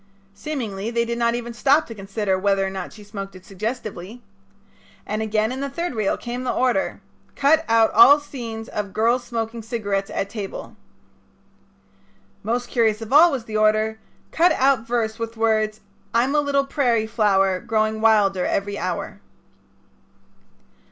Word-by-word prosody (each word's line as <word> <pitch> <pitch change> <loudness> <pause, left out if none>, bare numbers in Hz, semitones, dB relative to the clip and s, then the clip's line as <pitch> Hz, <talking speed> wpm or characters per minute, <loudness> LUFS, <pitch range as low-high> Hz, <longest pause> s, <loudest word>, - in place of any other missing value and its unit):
Seemingly 215 -4 -4
they 235 0 0
did 235 0 -3
not 235 0 +2
even 240 0 -5
stop 280 +6 +3
to 230 - -8
consider 195 -1 -2
whether 195 0 +1
or 190 - -3
not 190 -2 -6
she 210 - -13
smoked 195 -2 -8
it 185 0 -13
suggestively. 215 +1 -6 0.8
And 215 +1 -3
again 215 +1 0
in 260 - -4
the 280 0 -3
third 335 +3 -3
reel 215 -4 0
came 245 +1 -5
the 250 - -1
order: 255 +3 0 0.3
"Cut 310 +3 +3
out 225 -1 +4
all 300 -7 +8
scenes 230 -6 -7
of 205 -2 -5
girl's 235 +3 +2
smoking 230 -1 -4
cigarette 205 -4 -2
at 195 - -2
table." 200 -2 -7 1.7
Most 240 +3 -2
curious 225 -3 +1
of 225 +4 -6
all 330 +4 +8
was 260 -5 -3
the 215 -1 -3
order: 215 +1 +2 0.3
"Cut 345 +2 +4
out 260 -3 +2
verse 230 -1 -1
with 230 0 -5
words: 215 -1 +1 0.3
'I'm 250 +4 +2
a 300 - +3
little 280 -1 +1
prairie 245 -6 +1
flower 195 -4 +2
growing 215 0 -1
wilder 205 -4 +3
every 200 +2 -2
hour.'" - - -4
225 Hz, 160 wpm, -22 LUFS, 210-245 Hz, 1.7 s, all